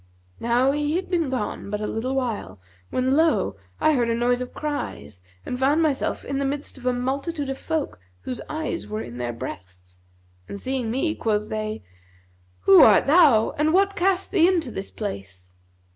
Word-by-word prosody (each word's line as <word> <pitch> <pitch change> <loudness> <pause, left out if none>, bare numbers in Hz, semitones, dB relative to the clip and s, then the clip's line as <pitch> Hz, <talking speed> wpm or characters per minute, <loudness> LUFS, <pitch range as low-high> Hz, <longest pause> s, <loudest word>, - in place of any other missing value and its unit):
Now 245 +3 +2
he 295 +2 -1
had 370 +1 -3
been 335 -5 +1
gone 245 -5 -3
but 210 0 -2
a 210 - -3
little 250 +5 -2
while, 225 - -3 0.3
when 260 +1 +1
lo! 300 - +2 0.2
I 310 - +4
heard 240 -4 +1
a 230 - +1
noise 245 +1 +1
of 250 - -5
cries 290 - -5 0.2
and 250 - -4
found 290 +5 +3
myself 295 -4 -1
in 275 0 -2
the - - 0
midst 280 +2 -3
of 250 - -6
a - - +4
multitude 275 +4 -2
of 270 - -6
folk 320 - -3 0.2
whose 250 - -5
eyes 310 - -3
were 105 +1 -4
in 120 +1 -9
their 120 -1 -2
breasts; 90 -4 -9 0.5
and 200 - -6
seeing 255 0 -2
me 270 +7 0
quoth 210 -4 -1
they, 215 - -4 0.8
'Who 195 - +8
art 205 -4 +7
thou 285 -8 +5
and 310 +1 +3
what 395 +1 +3
cast 380 +1 +1
thee 345 -4 +5
into 335 -9 +1
this 195 -2 -5
place?' 95 - -7
255 Hz, 185 wpm, -24 LUFS, 210-300 Hz, 0.8 s, Who